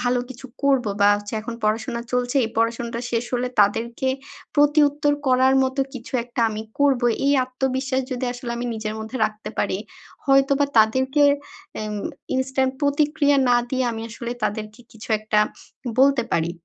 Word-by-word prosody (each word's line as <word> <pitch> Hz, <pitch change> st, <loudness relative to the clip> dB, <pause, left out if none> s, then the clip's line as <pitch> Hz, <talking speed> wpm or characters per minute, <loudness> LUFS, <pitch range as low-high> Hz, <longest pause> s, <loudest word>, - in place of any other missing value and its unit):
ভালো 245 Hz, 0 st, +1 dB
কিছু 260 Hz, +1 st, -10 dB, 0.2 s
করবো 265 Hz, -6 st, +2 dB
বা, 205 Hz, -, +6 dB
হচ্ছে 205 Hz, +1 st, -9 dB
এখন 230 Hz, +2 st, -6 dB
পড়াশোনা 225 Hz, +3 st, 0 dB
চলছে 250 Hz, +2 st, 0 dB
এই -, -, -2 dB
পড়াশোনাটা 230 Hz, +1 st, -1 dB
শেষ 235 Hz, 0 st, 0 dB
হলে 250 Hz, +1 st, 0 dB
তাদেরকে 235 Hz, +5 st, +1 dB, 0.5 s
প্রতিউত্তর 290 Hz, 0 st, +3 dB
করার 260 Hz, +1 st, +4 dB
মতো 260 Hz, +1 st, 0 dB
কিছু 240 Hz, 0 st, -9 dB
একটা 240 Hz, -1 st, -5 dB
আমি 215 Hz, 0 st, -4 dB, 0.2 s
করবো 270 Hz, -4 st, +3 dB, 0.2 s
এই 280 Hz, -, +4 dB
আত্মবিশ্বাস 260 Hz, +1 st, -1 dB
যদি 255 Hz, +1 st, -3 dB
আসলে 245 Hz, -1 st, -7 dB
আমি 245 Hz, +1 st, -3 dB
নিজের 215 Hz, 0 st, -4 dB
মধ্যে 220 Hz, +4 st, -6 dB
রাখতে 215 Hz, 0 st, -8 dB
পারি 195 Hz, -1 st, 0 dB, 0.5 s
হয়তোবা 275 Hz, +1 st, +4 dB
তাদেরকে 260 Hz, +6 st, +3 dB, 0.5 s
অ্যা 215 Hz, -, -4 dB, 0.5 s
ইনস্ট্যান্ট 260 Hz, 0 st, 0 dB
প্রতিক্রিয়া 290 Hz, 0 st, +2 dB
না 245 Hz, -, +5 dB
দিয়ে 260 Hz, -1 st, 0 dB
আমি 225 Hz, 0 st, -5 dB
আসলে 235 Hz, +1 st, -5 dB
তাদেরকে 215 Hz, +2 st, -4 dB
কিছু 220 Hz, +1 st, -12 dB
একটা 215 Hz, 0 st, 0 dB, 0.6 s
বলতে 275 Hz, -3 st, +4 dB
পারি। 165 Hz, 0 st, +1 dB
250 Hz, 155 wpm, -23 LUFS, 225-270 Hz, 0.6 s, বা